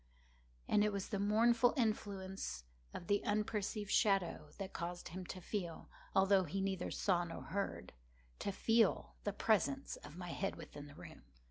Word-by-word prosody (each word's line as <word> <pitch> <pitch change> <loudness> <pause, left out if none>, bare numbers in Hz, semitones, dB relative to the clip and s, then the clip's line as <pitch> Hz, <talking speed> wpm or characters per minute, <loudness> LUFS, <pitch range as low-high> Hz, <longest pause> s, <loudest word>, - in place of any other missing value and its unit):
And 210 - +4
it 210 - +3
was 200 -1 -3
the 200 - -1
mournful 230 +4 +4
influence 195 - -1 0.3
of - - -7
the 205 +3 +2
unperceived 210 0 -1
shadow 195 -4 +2
that 195 -1 -5
caused 175 +1 -4
him 180 +2 -6
to 185 - -5
feel—although 190 +1 0
he 175 +5 -2
neither 190 -2 -1
saw 180 -3 +2
nor 165 -1 -6
heard—to - - -5
feel 225 +1 +3
the 205 - +1
presence 270 +7 +1
of 145 +3 -11
my 180 -1 -5
head 195 +3 -2
within 145 -3 -9
the 145 - -13
room. - - -11
195 Hz, 150 wpm, -37 LUFS, 175-210 Hz, 0.3 s, And